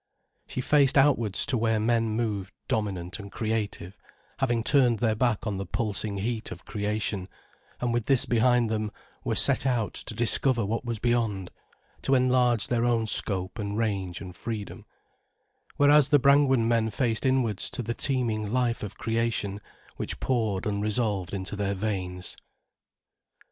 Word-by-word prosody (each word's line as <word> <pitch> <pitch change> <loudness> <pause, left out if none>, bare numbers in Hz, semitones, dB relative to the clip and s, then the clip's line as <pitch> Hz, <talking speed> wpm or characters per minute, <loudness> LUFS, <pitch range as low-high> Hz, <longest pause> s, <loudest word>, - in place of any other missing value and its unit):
She 130 - -3
faced 140 0 +3
outwards 125 -8 +3
to 125 - 0
where 110 -1 +2
men 115 +1 +1
moved 105 -4 -2
dominant 95 -3 -2
and 100 -1 -9
creative, 105 -4 -3 0.4
having 120 -4 +1
turned 125 -3 +4
their 110 0 +1
back 120 0 0
on 105 -3 -2
the 100 - -3
pulsing 105 -3 -2
heat 110 +3 -3
of 90 - -9
creation, 105 -2 -2 0.5
and 120 -1 -1
with 120 -2 -1
this 135 -3 +4
behind 120 0 +3
them, 110 -1 -2 0.3
were - - -1
set - - +2
out 120 -5 0
to 110 - -7
discover 120 0 +2
what 115 +5 -2
was 120 -2 -3
beyond, 110 -5 0 0.5
to 135 - +2
enlarge 125 -3 +3
their 120 -1 +1
own 120 -2 +2
scope 95 -2 -2
and 105 0 -3
range 100 -6 -2
and 90 -2 -8
freedom; 105 +2 -6 0.9
whereas 145 -1 +5
the 145 - +6
Brangwen 140 -3 +4
men 115 -1 +2
faced 115 0 0
inwards 130 -6 +1
to 125 - -4
the 115 +1 -2
teeming 115 -5 0
life 120 -1 0
of 100 -2 -6
creation, 115 -3 -1 0.4
which - - -4
poured 110 -7 0
unresolved 105 -2 0
into 100 +1 -4
their 100 -1 -1
veins. 95 -3 -3
110 Hz, 155 wpm, -27 LUFS, 100-120 Hz, 0.9 s, the